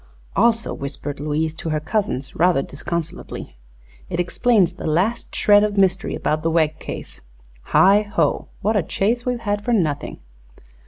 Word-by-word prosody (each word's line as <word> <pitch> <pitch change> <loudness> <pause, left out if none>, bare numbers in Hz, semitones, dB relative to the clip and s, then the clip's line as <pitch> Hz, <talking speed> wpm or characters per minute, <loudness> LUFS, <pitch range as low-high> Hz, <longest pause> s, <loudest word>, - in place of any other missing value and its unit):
"Also," 230 -1 +2
whispered 140 +1 -4
Louise 155 +2 -1
to 160 0 -5
her 155 -1 0
cousins, 160 - -2
rather 170 -4 +3
disconsolately, 165 - -5 0.5
"it 175 -1 -3
explains 185 0 +2
the 180 - -6
last 185 +10 0
shred 205 0 +5
of 210 -1 -1
mystery 190 -1 +2
about 155 0 -1
the 165 - 0
Wegg 160 -2 +1
case. - - -8 0.4
Heigh 200 +2 +5
ho! 205 -1 0 0.2
what 220 +2 +2
a 205 - +3
chase 230 +9 -1
we've 245 -1 -1
had 205 -2 -1
for 240 - 0
nothing!" 155 -9 0
180 Hz, 155 wpm, -21 LUFS, 155-210 Hz, 0.5 s, shred